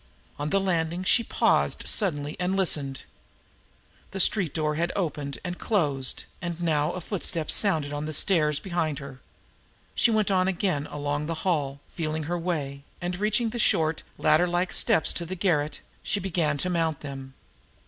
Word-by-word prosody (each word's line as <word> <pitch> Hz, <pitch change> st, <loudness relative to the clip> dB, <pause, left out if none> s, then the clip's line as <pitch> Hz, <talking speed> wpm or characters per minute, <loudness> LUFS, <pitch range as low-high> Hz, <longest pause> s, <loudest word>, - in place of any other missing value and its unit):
On 145 Hz, +1 st, -1 dB
the 195 Hz, -, +3 dB
landing, 175 Hz, -2 st, 0 dB
she 235 Hz, -, +4 dB
paused -, -, +2 dB
suddenly 150 Hz, -8 st, +1 dB
and 185 Hz, +2 st, 0 dB
listened. 145 Hz, -8 st, 0 dB, 1.1 s
The 195 Hz, -, -5 dB
street 185 Hz, -4 st, +4 dB
door 155 Hz, -1 st, 0 dB
had 170 Hz, +3 st, 0 dB
opened 145 Hz, -7 st, -2 dB
and 180 Hz, 0 st, -4 dB
closed, 145 Hz, -, 0 dB, 0.2 s
and 175 Hz, -1 st, -4 dB
now 155 Hz, -4 st, +1 dB
a -, -, -4 dB
footstep 170 Hz, -4 st, -2 dB
sounded 160 Hz, -8 st, +2 dB
on 145 Hz, +1 st, -3 dB
the -, -, -3 dB
stairs 150 Hz, -4 st, +3 dB
behind 170 Hz, -5 st, -1 dB
her. 140 Hz, -2 st, -9 dB, 0.7 s
She -, -, +4 dB
went 215 Hz, -2 st, +2 dB
on 185 Hz, -1 st, +3 dB
again 180 Hz, -6 st, 0 dB
along 145 Hz, 0 st, -2 dB
the 165 Hz, +1 st, -4 dB
hall, 140 Hz, -6 st, 0 dB
feeling 155 Hz, -2 st, -2 dB
her 175 Hz, +3 st, -2 dB
way; 145 Hz, -5 st, -2 dB, 0.2 s
and 180 Hz, +1 st, -3 dB
reaching 215 Hz, +2 st, +1 dB
the 240 Hz, -, -4 dB
short, 160 Hz, -6 st, +2 dB, 0.2 s
ladder 175 Hz, +3 st, +4 dB
like 175 Hz, +1 st, 0 dB
steps 160 Hz, -, +2 dB
to 175 Hz, -, -3 dB
the 180 Hz, +3 st, -5 dB
garret, 155 Hz, -6 st, 0 dB, 0.2 s
she 205 Hz, -, -1 dB
began 170 Hz, -6 st, 0 dB
to 180 Hz, -, -1 dB
mount 165 Hz, -4 st, 0 dB
them. 135 Hz, -2 st, -8 dB
165 Hz, 170 wpm, -27 LUFS, 145-185 Hz, 1.1 s, she